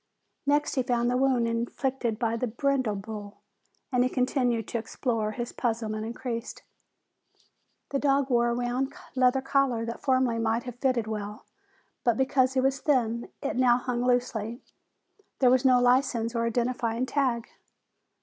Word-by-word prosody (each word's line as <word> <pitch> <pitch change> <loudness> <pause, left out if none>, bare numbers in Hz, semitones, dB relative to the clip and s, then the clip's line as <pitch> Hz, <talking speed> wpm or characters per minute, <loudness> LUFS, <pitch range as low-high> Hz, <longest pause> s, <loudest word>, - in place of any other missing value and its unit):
Next 290 +1 +2
he 260 - +1
found 240 -1 +1
the - - +1
wound 255 -2 +2
inflicted 235 0 -2
by 230 -1 0
the 245 +2 -1
brindle 255 -1 0
bull, 205 0 -7 0.5
and 250 -1 +3
as 255 - +1
he - - -13
continued 250 -3 +1
to 235 - -1
explore 225 -1 -2
his 240 0 -5
puzzlement 220 -2 -2
increased. 235 0 -5 1.3
The 275 - 0
dog 275 -1 +2
wore 240 0 +3
a 235 - 0
round 245 +2 -1 0.2
leather 260 0 +3
collar 270 -4 +1
that 230 +1 -6
formerly 255 -4 +2
might 225 +1 0
have 245 -1 -8
fitted 255 -4 +1
well, 210 -1 -5 0.6
but 235 -2 +2
because 265 -1 +2
he 265 - +2
was 270 +1 +1
thin, 235 -5 0
it - - -2
now 245 -1 +5
hung 245 -1 -2
loosely. 245 -2 -1 0.7
There 255 -2 +4
was 255 0 +4
no 255 -1 +6
license 245 -2 +2
or 230 -1 0
identifying 240 0 0
tag. 255 -3 0
245 Hz, 160 wpm, -27 LUFS, 230-260 Hz, 1.3 s, no